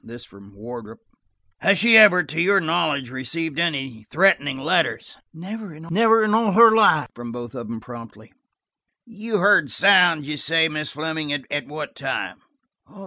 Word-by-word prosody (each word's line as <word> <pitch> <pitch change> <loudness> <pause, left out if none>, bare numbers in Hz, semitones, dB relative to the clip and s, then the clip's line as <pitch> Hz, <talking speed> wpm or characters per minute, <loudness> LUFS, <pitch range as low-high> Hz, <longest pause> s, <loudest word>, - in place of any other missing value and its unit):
This 120 +1 -12
from 100 0 -19
Wardrop. 115 +1 -11 0.6
"Has 195 0 +2
she 230 +4 +4
ever, 200 -5 +7
to 155 +2 -4
your 195 +3 +3
knowledge, 155 -7 -2
received 150 +5 -5
any 135 -10 -3
threatening 150 -6 +1
letters?" 135 - -2 0.2
"Never 195 +1 -10
in 215 +7 +1
all 220 -2 +1
her 230 +2 +7
life," 180 -9 +3
from 120 0 -9
both 120 -1 -9
of 120 -4 -8
them 115 0 -7
promptly. 115 -2 -13 0.7
"You 225 -1 -5
heard 205 +2 +3
sounds, 180 -7 +3
you 150 0 -4
say, 160 +3 +1
Miss 150 -1 -5
Fleming. 155 0 -4
At 145 +1 -4
what 150 0 -8
time?" - - -5
160 Hz, 150 wpm, -21 LUFS, 130-195 Hz, 0.7 s, ever